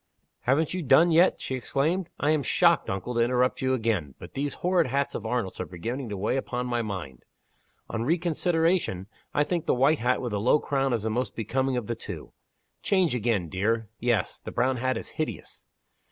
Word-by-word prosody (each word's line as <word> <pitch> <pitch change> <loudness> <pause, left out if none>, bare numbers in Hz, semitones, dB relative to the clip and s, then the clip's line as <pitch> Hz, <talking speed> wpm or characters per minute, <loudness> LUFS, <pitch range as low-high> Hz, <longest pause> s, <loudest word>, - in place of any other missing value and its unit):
"Haven't 145 +6 +1
you 185 - -2
done 160 +4 +5
yet!" 170 +3 +4
she - - -4
exclaimed. 155 +8 -1
"I 145 - +2
am 155 -2 +2
shocked, 130 - +3
uncle, 95 +6 -3
to 120 - 0
interrupt 125 +3 +2
you 130 0 +2
again 105 - -1
but - - -11
these 140 +1 -2
horrid 180 -3 +2
hats 140 +2 0
of 110 - -4
Arnold's 115 -5 -2
are - - -2
beginning 115 +9 -5
to 100 - -4
weigh 105 +7 0
upon 125 -2 -3
my 120 -1 0
mind. 85 - -6 0.6
On 110 - -3
reconsideration, 165 - +1 0.3
I 145 - +4
think 170 +2 -2
the - - +3
white 140 +5 +3
hat 125 +2 +1
with 120 -2 -3
the 105 - -1
low 125 +7 +5
crown 135 -2 0
is 115 -3 -1
the 110 - -1
most 125 +3 -2
becoming 130 +4 -1
of 120 - -2
the 115 - -2
two. - - -8 0.5
Change 185 -6 +2
again, 110 -7 0
dear. 105 +5 -1
Yes! 120 -2 0
the - - -8
brown 130 0 +1
hat 130 +1 0
is - - -6
hideous. 155 - -5
125 Hz, 200 wpm, -27 LUFS, 115-145 Hz, 0.6 s, done